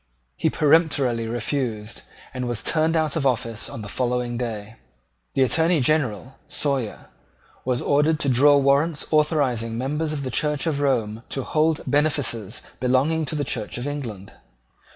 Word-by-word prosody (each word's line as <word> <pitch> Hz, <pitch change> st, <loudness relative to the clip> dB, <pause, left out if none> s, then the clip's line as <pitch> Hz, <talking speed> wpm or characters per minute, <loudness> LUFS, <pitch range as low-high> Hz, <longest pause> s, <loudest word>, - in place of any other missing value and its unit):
He -, -, +1 dB
peremptorily 140 Hz, -7 st, +2 dB
refused, 115 Hz, -2 st, -3 dB, 0.3 s
and 125 Hz, -1 st, -3 dB
was 120 Hz, -2 st, -3 dB
turned 160 Hz, 0 st, +1 dB
out 155 Hz, -3 st, +1 dB
of 160 Hz, -, 0 dB
office 115 Hz, -3 st, -1 dB
on 110 Hz, -, -7 dB
the -, -, -7 dB
following 125 Hz, +1 st, -1 dB
day. 110 Hz, -2 st, -5 dB, 0.6 s
The 135 Hz, -, +4 dB
Attorney 160 Hz, +7 st, +3 dB
General, 130 Hz, -, 0 dB
Sawyer, 140 Hz, -6 st, -2 dB, 0.6 s
was 125 Hz, -1 st, 0 dB
ordered 150 Hz, +2 st, +2 dB
to -, -, 0 dB
draw 140 Hz, +3 st, +6 dB
warrants 140 Hz, +3 st, +2 dB
authorising 135 Hz, -7 st, +1 dB
members 150 Hz, +5 st, -2 dB
of 145 Hz, -2 st, -3 dB
the 130 Hz, -, -4 dB
Church 150 Hz, +5 st, 0 dB
of 155 Hz, -4 st, 0 dB
Rome 115 Hz, -6 st, 0 dB
to 135 Hz, -, -2 dB
hold 155 Hz, +2 st, +1 dB
benefices 145 Hz, -8 st, 0 dB, 0.2 s
belonging 135 Hz, +6 st, +2 dB
to 155 Hz, -, -2 dB
the 145 Hz, -, -1 dB
Church 115 Hz, -4 st, -3 dB
of 120 Hz, -, -4 dB
England. 120 Hz, -10 st, -6 dB
135 Hz, 150 wpm, -23 LUFS, 120-150 Hz, 0.6 s, draw